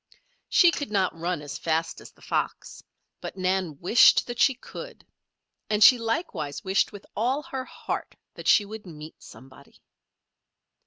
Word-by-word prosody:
She 350 -2 +6
could 285 -3 -4
not 195 -4 0
run 170 -1 -3
as 145 - -7
fast 165 0 -2
as - - -12
the - - -23
fox; - - -3 0.4
but - - -7
Nan 185 -4 -1
wished 220 +7 +5
that 240 -1 -7
she 270 +1 +4
could. - - -11 0.6
And 210 0 +3
she 250 +2 +8
likewise 225 - -3
wished 190 +1 +1
with 205 -1 -11
all 255 +7 0
her 265 -2 -6
heart - - -6 0.2
that - - -9
she 205 - +5
would 210 -1 -9
meet 155 -1 -11
somebody. 130 +1 -16
200 Hz, 155 wpm, -26 LUFS, 165-240 Hz, 0.6 s, she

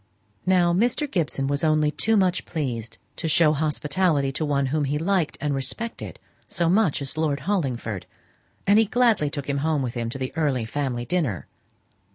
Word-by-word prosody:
Now 180 -2 +4
Mr. 235 +9 +1
Gibson 160 - -1
was 140 +2 -1
only 155 -1 +3
too 220 +7 +1
much 185 -2 +1
pleased 120 -8 -4 0.2
to - - -3
show 155 0 +4
hospitality 150 0 +1
to 145 - -3
one 140 -2 +1
whom 155 -2 +1
he 145 +2 -1
liked 175 0 0
and 150 -1 -1
respected 140 - -4 0.3
so 170 -1 +1
much 185 -8 +2
as 140 +2 -7
Lord 150 -3 0
Hollingford, 125 - -2 0.6
and 205 +2 +5
he 225 - +5
gladly 220 -8 +2
took 145 -2 -5
him 140 -1 0
home 155 -1 0
with 120 -2 -3
him 115 -2 -3
to 125 - -5
the 130 -1 -4
early 140 -7 0
family 125 -1 -2
dinner. 130 - -1
150 Hz, 180 wpm, -24 LUFS, 135-180 Hz, 0.6 s, and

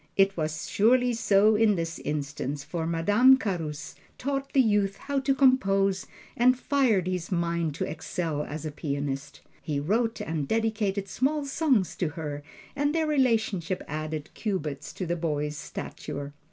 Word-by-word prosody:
It 195 0 +4
was 155 -1 -3
surely 245 +4 +3
so 210 -1 +4
in 210 -1 +4
this 165 -1 -3
instance, 145 -1 -3
for 165 0 -3
Madame 205 +11 +5
Carus 165 - -4 0.2
taught 275 +1 -3
the 275 - +2
youth 205 -5 +3
how 280 -1 -2
to 270 0 +1
compose, 195 -8 +3 0.3
and 250 +2 +4
fired 250 - +2
his 180 -1 -3
mind 170 -3 0
to - - -2
excel 160 -1 -3
as 150 +1 -6
a 155 - -3
pianist. 140 -2 -4 0.2
He 145 -2 -2
wrote 225 +9 0
and 155 -3 -3
dedicated 215 -2 0
small 280 +8 0
songs 270 - +1
to 175 - 0
her, 145 -2 -4 0.3
and 290 +2 0
their 320 -1 +2
relationship 220 - +1
added 155 0 -4
cubits 155 -8 -3
to 185 - -4
the 175 0 -1
boy's 150 -3 -2
stature. 145 -1 -6
190 Hz, 155 wpm, -27 LUFS, 155-230 Hz, 0.3 s, Madame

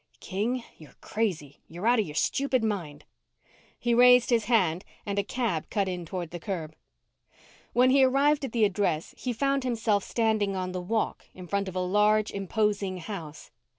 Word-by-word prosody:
King, 230 +6 -2 0.2
you're 155 -4 -15
crazy. 180 -11 -3
You're 175 +5 -7
out 240 0 +4
of 210 - 0
your 150 - -8
stupid 260 - +1
mind. 170 -9 -3 0.7
He 240 - 0
raised 250 0 +6
his 230 -2 +3
hand 185 -7 +2 0.2
and 200 -1 -1
a - - +1
cab 220 -7 -2
cut 200 -3 0
in 180 -2 -4
toward 175 -1 -5
the 175 - -6
curb. 170 -5 -5 1.0
When 255 +1 +4
he 270 0 +5
arrived 280 +3 +3
at 265 - -3
the 225 -2 +3
address, 185 -5 -1
he 255 - -3
found 275 +3 0
himself 225 -5 0
standing 220 -4 0
on 185 -1 -3
the 180 0 -4
walk 220 +5 -2
in 185 - -9
front 200 +2 -1
of 185 - -6
a - - 0
large, 210 +3 +3
imposing 200 -1 -1
house. 165 -4 -8
205 Hz, 180 wpm, -27 LUFS, 180-235 Hz, 1.0 s, raised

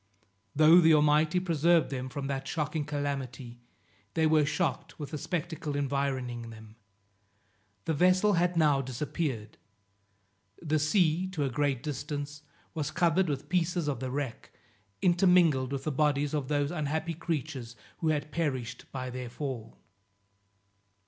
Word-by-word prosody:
Though 155 +4 +7
the 160 -1 +6
Almighty 150 +3 +3
preserved 170 -2 +2
them 130 -1 -4
from 140 0 -5
that 135 -1 -3
shocking 150 0 -2
calamity, 135 -5 -4 0.6
they 160 - +3
were 155 -2 +4
shocked 150 0 -2
with 145 -3 -7
the 155 - -3
spectacle 160 -4 -3
environing 135 -4 -2
them. 110 -1 -12 1.1
The 160 - 0
vessel 185 +6 +4
had 175 0 +1
now 150 -4 +4
disappeared; 130 -3 -4 1.0
the 155 -1 0
sea, 165 +2 +2
to 155 -5 -1
a 135 - -1
great 140 -2 0
distance, 145 0 -4 0.3
was 155 -3 -2
covered 175 +2 +2
with 140 -1 -3
pieces 175 -2 0
of 140 -5 -1
the 130 0 -3
wreck, 135 -2 -4 0.5
intermingled 175 -7 +4
with 135 -1 -3
the 155 - -1
bodies 145 0 +1
of 145 -3 -1
those 145 0 0
unhappy 160 0 -2
creatures 145 -7 -4 0.2
who 165 - -1
had 150 -1 0
perished 135 -8 -3
by 130 -1 -4
their 125 -1 -5
fall. 125 -3 -6
150 Hz, 140 wpm, -29 LUFS, 135-160 Hz, 1.1 s, Though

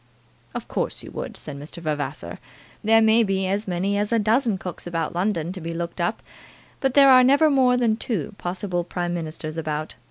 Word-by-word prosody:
"Of - - -5
course - - -2
you - - -10
would," - - -6
said 140 -2 -7
Mr. 150 +4 -10
Vavasor. 145 - -4 0.4
"There 225 +1 +5
may 220 +1 +5
be 195 -3 0
as 200 +3 -1
many 190 +3 0
as 210 +1 -1
a 230 - +3
dozen 225 0 +2
cooks 180 -1 -7
about 165 -2 -2
London 175 -2 -1
to 185 -1 -7
be 165 +1 -5
looked 170 +1 -4
up, 175 +6 -1 0.6
but 265 -2 0
there 275 -1 +8
are 255 -1 +8
never 285 +4 +5
more 255 -2 +4
than 230 -3 +2
two 210 - -3
possible 180 0 -2
Prime 175 0 -3
Ministers 155 -1 -5
about. 155 -1 -3
185 Hz, 195 wpm, -24 LUFS, 165-225 Hz, 0.6 s, there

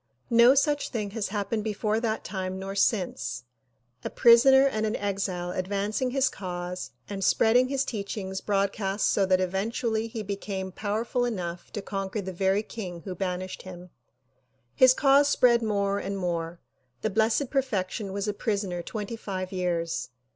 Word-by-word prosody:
No 235 +3 +7
such 290 +1 +1
thing 210 -5 -3
has 215 -1 -2
happened 210 +1 -2
before 215 0 0
that 225 -2 -2
time 185 -1 -4
nor 195 +1 -5
since; 195 - 0 0.6
a - - -3
prisoner 265 +3 +6
and 220 -6 0
an 215 - -1
exile 190 -3 -2
advancing 200 +7 -1
his 270 +1 +2
cause 180 -4 -5 0.2
and 195 -1 -4
spreading 240 +6 +4
his 275 0 0
teachings 200 -4 -4
broadcast 200 0 0
so 195 -2 +2
that 185 -1 +3
eventually 220 +4 -1
he 220 -1 -5
became 195 -1 -4
powerful 220 +5 -1
enough 180 -7 -4
to 205 - -4
conquer 195 +1 -3
the 190 -1 -5
very 195 +3 +1
king 180 -7 -7
who 185 +3 -6
banished 185 0 -4
him. 180 -1 -10 0.8
His 255 - +6
cause 280 0 +5
spread 240 -4 +4
more 200 -2 0
and 200 0 -4
more. 170 -2 -3 0.4
The 215 - 0
Blessed 220 +6 +1
Perfection 210 -7 -1
was 200 +1 -3
a 210 - 0
prisoner 200 -5 -2
twenty 210 +4 -5
five 185 -4 -5
years. 175 -3 -2
200 Hz, 155 wpm, -27 LUFS, 185-225 Hz, 0.8 s, No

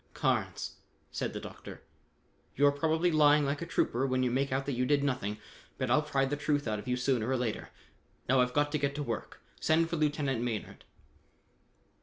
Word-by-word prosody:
"Carnes," - - -1 0.3
said - - -2
the - - -5
Doctor, - - -10 0.7
"you're 145 +1 +5
probably 160 +4 +1
lying 150 -1 +5
like 140 +2 -2
a 170 - -4
trooper 135 -5 +1
when 130 0 +1
you 125 - +1
make 135 +2 0
out 135 +1 0
that 140 - -2
you 125 -1 0
did 140 +2 +2
nothing, 125 -7 -1 0.4
but 130 -2 -1
I'll 150 - +5
pry 140 -3 0
the 140 +2 -1
truth 145 -2 0
out 105 -1 -1
of 105 - -10
you 125 0 0
sooner 125 -2 0
or 130 - +1
later. 120 -3 -3 0.6
Now 130 +1 +4
I've 125 0 +1
got 145 0 +2
to 150 - 0
get 140 0 -1
to 145 - -2
work. 115 -5 -5 0.2
Send 165 +1 +2
for 170 - 0
Lieutenant 145 -5 0
Maynard." 120 -3 -4
140 Hz, 200 wpm, -31 LUFS, 125-150 Hz, 0.7 s, you're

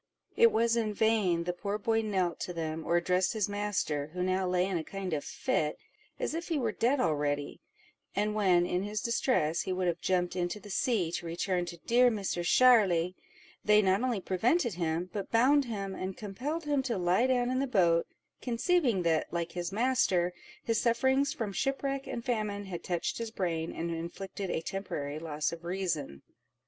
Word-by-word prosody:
It 465 0 +6
was 230 0 +2
in 215 -3 -1
vain 205 -7 +2
the 180 +1 -2
poor 200 +3 -3
boy 225 +2 +1
knelt 190 -5 -1
to 180 - -4
them, 160 -1 -3
or 170 - +3
addressed 180 +3 +1
his 215 -3 0
master, 205 -8 -1
who 180 - -1
now 185 0 0
lay 180 0 +2
in 190 -3 -1
a - - -4
kind 195 0 -5
of 145 - -1
fit, 150 -1 -1 0.4
as - - -2
if 335 +2 -4
he 330 - 0
were 235 -5 0
dead 250 +6 +1
already; 145 - -1 0.5
and 210 +1 +1
when, 185 -5 +3
in 180 +1 -1
his 210 +2 -3
distress, 230 - +1
he - - -3
would 185 0 -1
have 170 -1 -1
jumped 180 -1 0
into 180 +3 -2
the 205 -1 -11
sea, 195 -7 +1
to 170 - -4
return 175 +1 -1
to 170 - -7
"dear 245 +8 +4
Misser 200 -5 -2
Sharly," 185 -5 +4 0.5
they 210 0 +5
not 190 +2 +3
only 250 -5 0
prevented 230 - +1
him, 170 +1 -2
but 200 -3 -4
bound 270 +5 +4
him, 200 -5 -4
and 190 0 -5
compelled 255 +11 -4
him 290 -2 +1
to 245 -5 -2
lie 180 +7 +2
down 250 -1 +1
in 255 - 0
the 275 - 0
boat, 170 -8 +3 0.3
conceiving 245 - +1
that, 160 -2 +1
like 170 -1 -2
his 175 0 -4
master, 200 -6 +2 0.3
his 230 -1 +1
sufferings 265 +4 +2
from 210 -4 -4
shipwreck 275 +4 -1
and 235 - -5
famine 210 -4 -2
had 175 -3 -6
touched 180 +7 -2
his 230 -1 -3
brain, 170 -6 -2
and 170 +1 -4
inflicted 180 +4 -5
a 160 - -1
temporary 155 -6 -4
loss 155 -2 -2
of 170 0 -8
reason. 170 - -3
195 Hz, 190 wpm, -30 LUFS, 175-230 Hz, 0.5 s, It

